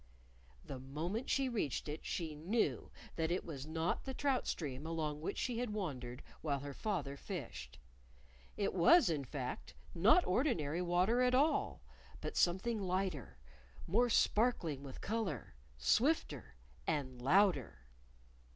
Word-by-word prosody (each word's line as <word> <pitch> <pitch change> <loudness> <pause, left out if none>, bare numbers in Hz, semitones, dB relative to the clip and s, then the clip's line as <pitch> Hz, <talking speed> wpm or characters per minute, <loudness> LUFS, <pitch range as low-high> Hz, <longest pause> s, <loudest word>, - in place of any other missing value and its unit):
The 135 - -6
moment 165 - -4
she 270 -1 +2
reached 210 - -2
it 150 +1 -5
she 165 -3 -3
knew 180 +10 0 0.3
that 160 -1 +1
it 175 - -1
was 145 -4 -6
not 160 +2 -1
the 265 -1 -5
trout 275 -2 +1
stream 140 -4 -3
along 155 -2 -2
which 160 - -3
she 240 -2 -1
had 245 -1 -1
wandered 130 -11 -4 0.2
while 140 -3 -1
her 140 0 -6
father 145 -7 -2
fished. 120 - -7 0.8
It 200 - 0
was, 190 - +6
in 150 -3 -1
fact, 130 -1 -5 0.2
not 225 - +5
ordinary 180 - +1
water 180 +7 +2
at 250 0 +4
all, 300 +4 +2 0.4
but - - -5
something 200 +5 +2
lighter, 185 - -2 0.5
more 240 +7 +3
sparkling 210 - +2
with 135 -2 -9
color, 205 - -3 0.2
swifter, 145 - +1 0.3
and 130 -5 -2
louder. 140 - +3
170 Hz, 135 wpm, -36 LUFS, 140-220 Hz, 0.8 s, was